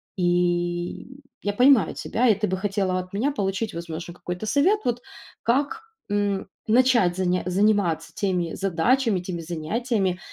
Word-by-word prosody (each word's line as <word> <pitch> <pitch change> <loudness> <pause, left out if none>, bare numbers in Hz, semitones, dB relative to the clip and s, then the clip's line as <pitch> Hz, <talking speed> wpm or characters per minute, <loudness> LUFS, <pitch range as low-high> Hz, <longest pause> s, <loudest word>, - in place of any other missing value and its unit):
И, 175 -1 0
м, 270 +2 -14 0.2
я 205 0 -1
понимаю 255 0 +4
тебя, 245 +2 0
и 220 - +5
ты 210 +1 -1
бы 190 - -1
хотела 195 -2 0
от 185 +1 -8
меня 250 +9 0
получить, 200 -2 -2
возможно, 170 0 -6
какой-то 180 +3 -6
совет 290 - +3
вот, 245 0 0 0.4
как, 285 - +1 0.3
м, 205 -1 0 0.2
начать 235 -6 +4
заня 180 -1 0
заниматься 195 -2 +1
теми 185 -5 -1
задачами, 195 +4 +1
теми 180 -2 -5
занятиями, 185 +4 -1
195 Hz, 145 wpm, -24 LUFS, 175-235 Hz, 0.4 s, и